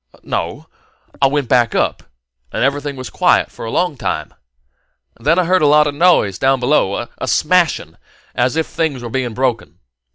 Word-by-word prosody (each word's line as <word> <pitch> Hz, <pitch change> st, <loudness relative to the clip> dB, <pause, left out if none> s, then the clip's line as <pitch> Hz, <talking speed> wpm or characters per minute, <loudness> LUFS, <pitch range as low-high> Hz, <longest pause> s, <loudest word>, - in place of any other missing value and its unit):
"No. -, -, -4 dB, 0.6 s
I 135 Hz, -, +6 dB
went 140 Hz, -1 st, -1 dB
back 120 Hz, -1 st, +2 dB
up, -, -, 0 dB, 0.5 s
and -, -, -1 dB
everything 140 Hz, +1 st, -1 dB
was 130 Hz, -1 st, -8 dB
quiet -, -, +2 dB
for -, -, -9 dB
a -, -, -4 dB
long 175 Hz, +2 st, -1 dB
time. 75 Hz, -9 st, -3 dB, 0.9 s
Then 165 Hz, -, +2 dB
I 185 Hz, -, +3 dB
heard 185 Hz, +1 st, +2 dB
a 150 Hz, -, +4 dB
lot 150 Hz, +1 st, +5 dB
of 145 Hz, -, -1 dB
noise 145 Hz, -, +3 dB
down 135 Hz, 0 st, +2 dB
below 120 Hz, -4 st, +1 dB
a -, -, -4 dB
smashing 155 Hz, -, +1 dB, 0.4 s
as 125 Hz, +3 st, 0 dB
if 160 Hz, -1 st, 0 dB
things 145 Hz, -6 st, -3 dB
were 120 Hz, -, -6 dB
being 125 Hz, -3 st, -2 dB
broken. 125 Hz, -4 st, -2 dB
135 Hz, 180 wpm, -17 LUFS, 120-150 Hz, 0.9 s, I